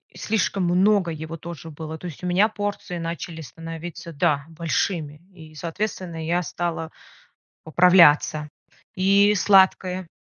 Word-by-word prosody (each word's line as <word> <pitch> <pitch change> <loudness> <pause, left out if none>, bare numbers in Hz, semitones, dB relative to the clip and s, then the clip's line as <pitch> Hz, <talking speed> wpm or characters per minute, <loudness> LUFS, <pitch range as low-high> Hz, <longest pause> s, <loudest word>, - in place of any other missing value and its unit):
слишком 205 -3 -1
много 185 +1 +3
его 160 +1 -6
тоже 165 0 -9
было. 160 +1 -7
То 180 - -7
есть 170 0 -10
у - - -2
меня 185 +4 +4
порции 205 -4 -4
начали 165 0 -5
становиться, 165 +2 -8
да, 145 0 +1
большими, 160 -1 -2
и, 160 -4 -14
соответственно, 170 0 -4
я 175 +2 +1
стала 165 -1 -4 0.7
поправляться. 160 -3 +5 0.5
И 200 +2 +4
сладкое. 190 -2 +3
170 Hz, 125 wpm, -23 LUFS, 160-185 Hz, 0.7 s, поправляться